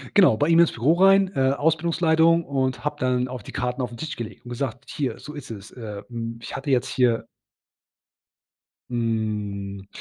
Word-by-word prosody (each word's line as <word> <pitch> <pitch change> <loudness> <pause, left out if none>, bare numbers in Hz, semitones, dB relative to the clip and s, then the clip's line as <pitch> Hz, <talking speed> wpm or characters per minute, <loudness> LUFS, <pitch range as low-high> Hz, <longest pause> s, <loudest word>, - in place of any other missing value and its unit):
Genau, 180 - +6
bei 145 - +2
ihm 165 0 +5
ins 170 - +6
Büro 130 +7 +2
rein, 195 +1 +5
äh, 135 0 +3
Ausbildungsleitung 160 +2 +3
und 130 -3 -1
habe 150 0 -1
dann 125 -1 +1
auch 125 -1 -6
die - - -10
Karten 125 +1 -2
auf 125 -1 -3
'n 120 - -9
Tisch 155 +5 -5
gelegt 115 0 -8
und - - -9
gesagt: 120 0 -4
„Hier, 140 -4 -3
so 150 - -9
ist 145 -5 -8
es. 100 -3 -9
Äh, 105 -4 -7
hm, 115 -1 -5
ich - - -7
hatte 135 +2 -4
jetzt 130 0 +2
hier“ 125 -3 +1 1.6
Hm, 105 -4 -2
125 Hz, 185 wpm, -24 LUFS, 115-150 Hz, 1.6 s, Genau